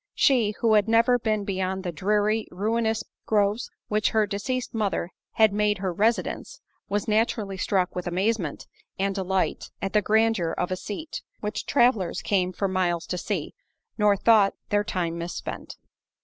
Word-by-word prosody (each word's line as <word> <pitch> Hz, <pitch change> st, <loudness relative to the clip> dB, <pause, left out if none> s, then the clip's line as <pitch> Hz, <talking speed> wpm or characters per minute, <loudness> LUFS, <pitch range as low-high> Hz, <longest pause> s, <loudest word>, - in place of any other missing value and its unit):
She, 230 Hz, -6 st, +3 dB
who 225 Hz, -2 st, +3 dB
had 210 Hz, 0 st, +4 dB
never 230 Hz, +2 st, +4 dB
been 215 Hz, -2 st, 0 dB
beyond 190 Hz, -1 st, -2 dB
the 180 Hz, -, -2 dB
dreary, 210 Hz, +5 st, +1 dB
ruinous 220 Hz, +3 st, 0 dB, 0.3 s
places 210 Hz, +1 st, +1 dB, 0.2 s
which 215 Hz, 0 st, +1 dB
her 220 Hz, -1 st, +2 dB
deceased 220 Hz, +5 st, -3 dB
mother 200 Hz, -5 st, -1 dB, 0.2 s
had 220 Hz, -2 st, +4 dB
made 210 Hz, 0 st, +2 dB
her 185 Hz, -2 st, -2 dB
residence, 230 Hz, -, -1 dB, 0.3 s
was 205 Hz, 0 st, -1 dB
naturally 215 Hz, -2 st, 0 dB
struck 190 Hz, -1 st, 0 dB
with 180 Hz, 0 st, -4 dB
amazement 185 Hz, -2 st, -1 dB, 0.3 s
and 195 Hz, +1 st, 0 dB
delight 190 Hz, -1 st, -1 dB
at 195 Hz, -, -3 dB
the 210 Hz, -, +4 dB
grandeur 220 Hz, -5 st, +2 dB
of 180 Hz, -, -1 dB
a -, -, +1 dB
seat, 215 Hz, -, -6 dB, 0.2 s
which 210 Hz, 0 st, -4 dB
travellers 240 Hz, -9 st, +2 dB
came 185 Hz, -3 st, +1 dB
for 195 Hz, +2 st, -1 dB
miles 175 Hz, -3 st, 0 dB
to 180 Hz, -, -3 dB
see, -, -, -3 dB, 0.4 s
nor 210 Hz, -2 st, +3 dB
thought 210 Hz, -2 st, +4 dB
their 205 Hz, 0 st, +2 dB
time 175 Hz, -5 st, -2 dB
mispent. 170 Hz, +1 st, -6 dB
205 Hz, 160 wpm, -25 LUFS, 185-220 Hz, 0.4 s, had